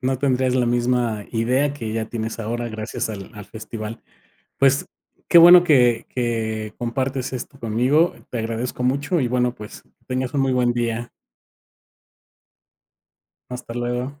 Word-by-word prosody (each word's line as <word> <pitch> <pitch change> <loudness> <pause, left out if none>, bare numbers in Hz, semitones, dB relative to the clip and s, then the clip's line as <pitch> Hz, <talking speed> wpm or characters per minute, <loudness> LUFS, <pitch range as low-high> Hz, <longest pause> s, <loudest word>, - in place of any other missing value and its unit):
No 130 0 0
tendrías 130 -2 +1
la 125 -2 +2
misma 120 -3 0
idea 130 +5 +1
que 115 -6 -5
ya 110 -1 -2
tienes 115 -1 -4
ahora 120 +1 -3
gracias 110 0 -4
al 100 -3 -8
al 105 -2 -9
festival. 110 +1 -7 0.6
Pues, 135 0 +3 0.4
qué 170 - +7
bueno 175 +1 +9
que 125 -8 +3
que 110 -3 -2
compartes 130 +2 -3
esto 130 +2 -7
conmigo. 125 +9 +2 0.2
Te 120 - -3
agradezco 115 +3 -3
mucho 140 +6 0
y 125 - 0
bueno, 125 0 0
pues, 105 -3 -11
que - - -36
tengas 130 +1 -3
un 140 - +1
muy 135 -1 +1
buen 125 -1 +2
día. 120 0 -2 2.4
Hasta 125 -2 -7
luego. 125 +4 -3
120 Hz, 150 wpm, -22 LUFS, 115-130 Hz, 2.4 s, bueno